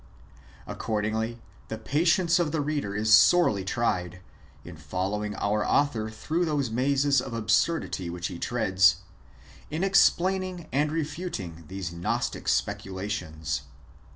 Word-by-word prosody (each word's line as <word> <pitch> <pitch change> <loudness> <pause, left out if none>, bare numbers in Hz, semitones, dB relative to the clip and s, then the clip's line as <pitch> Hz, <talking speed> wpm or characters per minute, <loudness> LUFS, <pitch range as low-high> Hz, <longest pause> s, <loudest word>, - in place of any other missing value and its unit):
Accordingly, 110 +2 -2 0.3
the 110 - -5
patience 165 +8 +2
of 165 -4 0
the 160 - -1
reader 145 -9 -2
is 110 +1 +2
sorely 110 - +5
tried, 90 -4 -1 0.5
in 90 - -9
following 95 +7 -3
our 105 +1 0
author 120 -7 +1
through 155 +11 -2
those 145 -7 -1
mazes 135 +2 +2
of 125 -3 -6
absurdity 110 - 0
which 85 +1 -5
he 85 - -4
treads, 95 -6 +3 0.7
in 155 +4 -2
explaining 185 -2 +2
and 145 +2 +1
refuting 150 - -4
these 95 0 -5
Gnostic 85 +1 -2
specula 95 +1 -1
tions. 80 -7 -3
110 Hz, 125 wpm, -27 LUFS, 95-150 Hz, 0.7 s, sorely